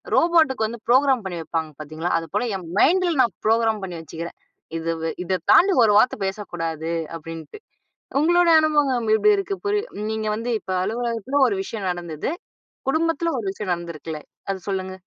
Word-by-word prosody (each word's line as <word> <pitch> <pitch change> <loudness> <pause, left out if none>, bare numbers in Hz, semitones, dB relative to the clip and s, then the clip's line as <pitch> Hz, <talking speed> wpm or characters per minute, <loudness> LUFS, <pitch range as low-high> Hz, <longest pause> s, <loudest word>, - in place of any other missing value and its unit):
ரோபோட்டுக்கு 315 -9 +3
வந்து 230 0 -8
ப்ரோகிராம் 260 -2 +4
பண்ணி 175 -3 -4
வைப்பாங்க 160 -1 -3
பாத்தீங்களா? 155 +3 -4
அது 165 - -8
போல 245 +3 +1
என் 175 -3 -10
மைண்டுல 345 -2 +3
நான் 235 - -1
ப்ரோகிராம் 225 -2 +2
பண்ணி 175 -2 -6
வச்சுக்கிறேன். 165 +2 -7 0.4
இது 165 +1 -2 0.3
இத 185 0 0
தாண்டி 390 +2 +6
ஒரு 210 - +4
வார்த்த 250 - +3
பேசக்கூடாது. 165 -5 -4 0.3
அப்படின்ட்டு 165 - -9 0.6
உங்களோட 345 +2 +4
அனுபவம் 275 -7 +2
இப்படி 420 - +5
இருக்கு. 395 0 -2
புரிய 415 0 +2 0.3
நீங்க 220 0 -2
வந்து 230 +2 -4
இப்போ 190 - -5
அலுவலகத்தில 235 +5 -1
ஒரு 200 - -1
விஷயம் 200 -2 -5
நடந்தது 170 - -4 0.6
குடும்பத்தில 330 +2 +1
ஒரு 210 - -5
விஷயம் 195 -2 -4
நடந்திருக்குல்ல. 165 -2 -6 0.3
அத 195 - -1
சொல்லுங்க. 190 -1 -3
215 Hz, 155 wpm, -23 LUFS, 170-280 Hz, 0.6 s, தாண்டி